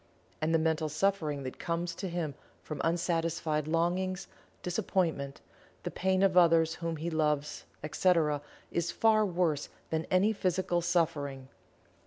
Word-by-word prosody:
And 155 +1 +1
the 165 - +5
mental 160 -1 +1
suffering 155 -4 0
that 130 - -6
comes 170 0 -2
to 190 +2 -4
him 170 -4 -2 0.3
from 155 - -5
unsatisfied 165 -2 0
longings, 180 +3 0 0.4
disappointment, 175 -7 -1 0.4
the - - -3
pain 190 +1 +1
of 190 -2 +3
others 165 -2 +5
whom 165 -1 -3
he 165 +3 -3
loves, 150 -2 0 0.2
etc., 155 -2 +2 0.3
is 170 - 0
far 220 -1 +4
worse 170 -6 0 0.2
than 160 0 -1
any 195 +4 +4
physical 185 -3 0
suffering. 150 -6 0
165 Hz, 135 wpm, -31 LUFS, 155-180 Hz, 0.4 s, the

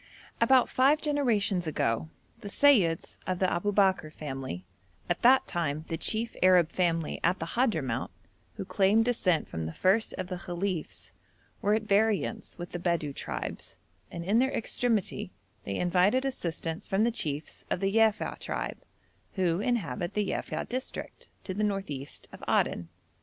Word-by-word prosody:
About 260 -2 +5
five 275 +4 +4
generations 225 - +1
ago 130 -1 0 0.3
the - - -8
Seyyids 200 - +3
of 185 -1 0
the 185 - +1
Aboubekr 190 -2 +2
family, 135 - -6 0.4
at 175 - -1
that 260 +2 +6
time 155 -3 -2
the 165 - -1
chief 225 +7 0
Arab 180 -3 +5
family 165 -3 0
at 180 +2 +3
the 165 - -4
Hadhramout, 160 - 0 0.5
who - - -5
claimed 200 +4 +3
descent 185 -9 +1
from 80 -1 -4
the 80 - -7
first 195 +4 +2
of 185 - -4
the 180 0 -5
Khalifs, 175 - -4 0.5
were 205 +1 +3
at 220 - -1
variance 215 0 +1
with 175 0 -7
the 175 - -4
Bedou 170 -5 -1
tribes, - - -5 0.3
and 170 0 -6
in 210 +5 +3
their 265 +1 +3
extremity 215 -5 -1 0.3
they 100 - -3
invited 185 +9 +2
assistance 170 -9 -3
from 195 +2 +2
the 235 - +3
chiefs 150 -8 -4
of - - 0
the 195 +2 0
Yafei 220 -2 +2
tribe, - - -4 0.5
who 180 -3 +1
inhabit 180 - -1
the 210 -1 +1
Yafei - - -3
district, 255 +2 -6
to 190 - -4
the 210 +3 -1
north 195 -4 -1
east 140 0 -7
of - - -12
Aden. 85 -1 +1
185 Hz, 160 wpm, -29 LUFS, 165-220 Hz, 0.5 s, that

